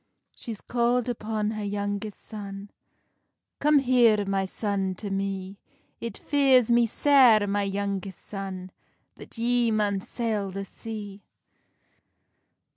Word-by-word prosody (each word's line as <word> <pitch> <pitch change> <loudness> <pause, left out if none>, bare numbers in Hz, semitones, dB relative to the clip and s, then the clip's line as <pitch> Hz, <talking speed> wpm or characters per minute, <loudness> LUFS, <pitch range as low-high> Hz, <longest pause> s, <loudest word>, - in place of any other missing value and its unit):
She's 225 -4 -7
calld 240 0 +1
upon 215 -2 -2
her 215 -1 -4
youngest 205 0 -3
son: 200 -2 -8 0.9
"Come 300 +1 +4
here, 240 -6 +4
my 195 0 0
son, 195 -1 -2
to 200 +2 -6
me; 195 0 -3 0.4
It 230 -3 -5
fears 265 -5 +3
me 235 0 +5
sair, 245 -4 +5
my 205 0 0
youngest 195 -1 -3
son, 190 -2 -6 0.5
That - - -12
ye 240 0 +2
maun 210 -2 +1
sail 215 -3 -2
the 195 +1 -5
sea." 205 -1 -8
210 Hz, 120 wpm, -26 LUFS, 195-235 Hz, 0.9 s, me